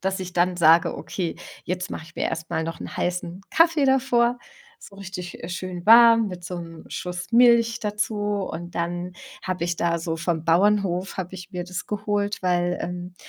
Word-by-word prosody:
dass 190 0 -1
ich 180 -1 -6
dann 175 +1 +2
sage: 165 0 +5
„Okay, 175 -4 -4 0.3
jetzt 180 0 -3
mach - - -5
ich 160 0 -15
mir - - -2
erst 160 0 -5
mal 160 - 0
noch 165 0 -6
'n - - -7
heißen 180 +1 -3
Kaffee 325 -3 +4
davor.“ 250 -2 +2 0.5
So 200 - -15
richtig, 185 -2 -7
äh, 165 - -6
schön 180 0 -6
warm 230 -1 +7
mit 180 -1 -8
so 180 0 -5
'nem 165 -1 -10
Schuss 180 +3 -6
Milch 235 -1 +5
dazu. 210 +1 -2
Und 200 -4 -3
dann 175 +1 -3 0.3
hab 185 -2 -3
ich 170 0 -1
da 170 0 0
so 165 0 -3
vom 165 -1 -1
Bauernhof 190 +1 +2
habe 185 -1 -5
ich 180 +1 -9
mir 180 -1 -4
das 180 0 -6
geholt, 205 -1 -2
weil, 175 -1 +1
ähm, 180 0 -6
180 Hz, 190 wpm, -24 LUFS, 175-205 Hz, 0.5 s, warm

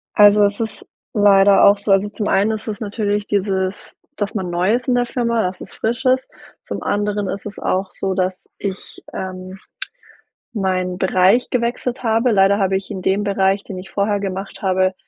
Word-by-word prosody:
Also, 205 0 +7
es 200 0 -1
ist 225 -2 -5 0.3
leider 200 -1 +5
auch 200 +1 +6
so 200 0 -2
also 195 +1 +3
zum 210 0 -4
einen 205 +3 +2
ist 220 0 -5
es 210 -2 -4
natürlich 205 -1 -2
dieses, 190 -1 -2 0.2
dass 205 -1 -2
man 190 -5 -3
neu 180 +5 +1
ist 250 +1 -4
in 250 - +2
der 245 0 +2
Firma, 235 -2 0
dass 185 0 -4
es - - -10
frisch 235 +4 -3
ist. 255 0 +2 0.4
Zum - - -5
anderen 205 0 -1
ist 195 - -5
es 210 -1 -7
auch 190 +1 -1
so, 190 -1 -3
dass 185 0 -2
ich, 195 -1 -6
ähm, 185 0 -6 1.0
meinen 185 -3 -1
Bereich 190 +5 +3
gewechselt 245 +1 -2
habe. 230 +1 +2
Leider 195 0 +4
habe 190 -1 +2
ich 190 - -8
in 190 - -5
dem 195 +3 +1
Bereich, 195 0 +1
den 190 - -7
ich 190 +1 -9
vorher 205 0 0
gemacht 195 0 -5
habe, 185 -1 +1
200 Hz, 190 wpm, -19 LUFS, 190-215 Hz, 1.0 s, Also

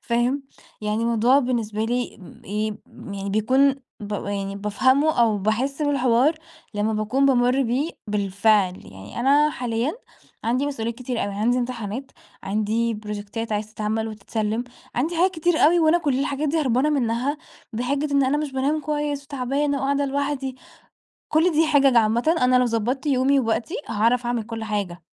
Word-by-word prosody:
فاهم؟ 245 +4 0 0.4
يعني 215 +2 -1
موضوع 235 +3 +4
بالنسبة 230 -5 -1
لي 245 +2 -2
امم 185 - -15
إيه 210 +2 -2 0.2
م 200 - -10
يعني 200 0 -4
بيكون 260 +7 +3 0.3
بابقى 205 -1 -3
يعني 195 0 -4
بافهمُه 260 +9 +2
أو 220 -3 +3
باحس 245 +9 -1
بالحوار 275 0 +3 0.4
لمّا 210 +1 0
باكون 220 +6 +1
بامُرّ 255 0 +3
بيه 265 +6 0 0.2
بالفعل، 200 -1 +2
يعني 95 - -9
أنا 290 +4 +4
حاليًا 245 +1 -2 0.5
عندي 250 +5 +1
مسؤوليات 235 -5 -3
كتير 250 0 -3
أوي، 200 0 -4
عندي 230 +5 +1
امتحانات، 240 +1 -4 0.3
عندي 215 +3 0
بروجيكتات 210 +1 -5
عايزة 210 0 -2
تتعَمَل 220 +1 -2
وتتسلّم، 215 +2 -3 0.3
عندي 315 +8 -1
حاجات 365 +3 +4
كتير 345 -1 0
أوي، 335 +4 +5
وأنا 325 +1 +4
كُلّ 285 -6 0
الحاجات 285 +2 -1
دي 320 +3 +1
هربانة 265 +1 +2
منها 260 +1 0 0.4
بحجّة 275 +6 -1
إن 280 -1 +4
أنا 265 +3 +1
مش 300 -2 -3
بانام 275 +4 0
كويس 295 -1 -2
وتعبانة 280 +1 -1
وقاعدة 280 +1 0
لوحدي، 275 -1 -2 0.7
كُلّ 325 +3 +3
دي 315 +1 +3
حِجَج 275 -4 +4
عامةً، 235 +8 +3
أنا 250 0 +4
لو 250 - +4
ضبَّطت 240 +5 -1
يومي 275 0 +3
ووقتي، 230 +6 -1
هاعرف 230 +3 +1
أعمل 240 -1 -1
كُلّ 225 0 -6
حاجة. 200 -5 -3
245 Hz, 160 wpm, -23 LUFS, 215-280 Hz, 0.7 s, أوي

